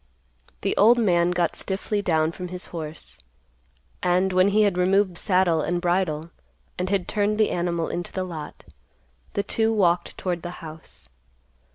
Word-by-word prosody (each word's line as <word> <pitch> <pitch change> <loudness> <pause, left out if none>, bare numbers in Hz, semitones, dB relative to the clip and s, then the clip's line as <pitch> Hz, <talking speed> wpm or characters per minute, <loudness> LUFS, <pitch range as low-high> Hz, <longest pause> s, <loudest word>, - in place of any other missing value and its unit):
The - - 0
old 230 +4 +6
man 175 -6 +3
got 175 -2 0
stiffly 205 +2 -2
down 160 -4 +1
from 180 +1 -7
his 180 0 -5
horse, 155 -2 -7 0.8
and 180 +1 +2
when 185 +1 +5
he 210 +2 +4
had 200 -3 +2
removed 185 +1 +2
saddle 180 -3 +2
and 175 +3 -1
bridle, 175 -3 0 0.4
and 180 +1 -2
had 195 -3 0
turned 210 0 0
the 215 - +2
animal 170 -1 -1
into 175 0 -4
the 185 - -2
lot, 160 -5 -8 0.7
the 200 - 0
two 225 +1 +1
walked 180 -5 +1
toward 175 -2 -2
the 175 - -5 0.2
house. 155 - -12
180 Hz, 160 wpm, -24 LUFS, 170-195 Hz, 0.8 s, old